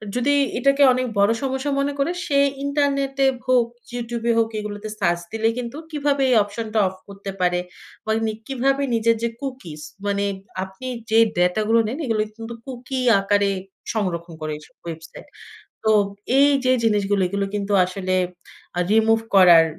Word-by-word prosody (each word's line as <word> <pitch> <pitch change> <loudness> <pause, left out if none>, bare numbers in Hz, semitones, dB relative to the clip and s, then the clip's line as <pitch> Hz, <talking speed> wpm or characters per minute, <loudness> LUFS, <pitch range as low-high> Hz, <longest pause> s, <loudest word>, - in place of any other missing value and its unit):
যদি 255 +4 +2 0.2
এটাকে 275 +1 +3
অনেক 255 0 0
বড় 200 +2 +5
সমস্যা 265 +1 -1
মনে 280 +1 0
করে, 280 +5 +1
সে 280 - +1 0.3
ইন্টারনেটে 275 -1 +1 0.2
হোক, 250 -2 +4 0.3
YouTube 235 -1 -4
এ - - +6
হোক 225 -1 +2
এগুলোতে 210 0 -6
সার্চ 175 -3 +1
দিলে 225 0 0
কিন্তু 245 +2 -5
কিভাবে 285 -2 0
এই 250 - +4
অপশনটা 215 +2 -3
অফ 185 - -6
করতে 200 0 -7
পারে 180 0 +2 0.5
বা 220 - -1
উনি 220 -1 0 0.2
কিভাবে 270 +1 +1
নিজের 230 0 +3
যে, 235 - +1
কুকিস 255 - -6 0.2
মানে 200 0 0 0.4
আপনি 190 +7 -9 0.2
যে, 220 - +3 0.2
ডাটা 180 +4 +2
গুলো 230 +1 +5
নেন 240 +6 -4
এগুলো 225 -3 +1 0.2
কিন্তু 225 +1 -7
কুকি 255 0 -5 0.2
আকারে 200 0 +2 0.4
সংরক্ষণ 175 -6 -2
করে 155 0 -3
ওইসব 150 - -17
ওয়েবসাইট। 165 - -9 0.6
তো 220 - +3 0.5
এই 285 +1 +6 0.2
যে, 255 - +4
জিনিসগুলো, 205 -2 +2
এগুলো 200 +2 -1
কিন্তু 205 0 -2
আসলে 185 0 -2 0.6
আ - - +1
রিমুভ 225 +1 +4 0.2
করার, 175 -4 +8
225 Hz, 160 wpm, -22 LUFS, 195-260 Hz, 0.6 s, করার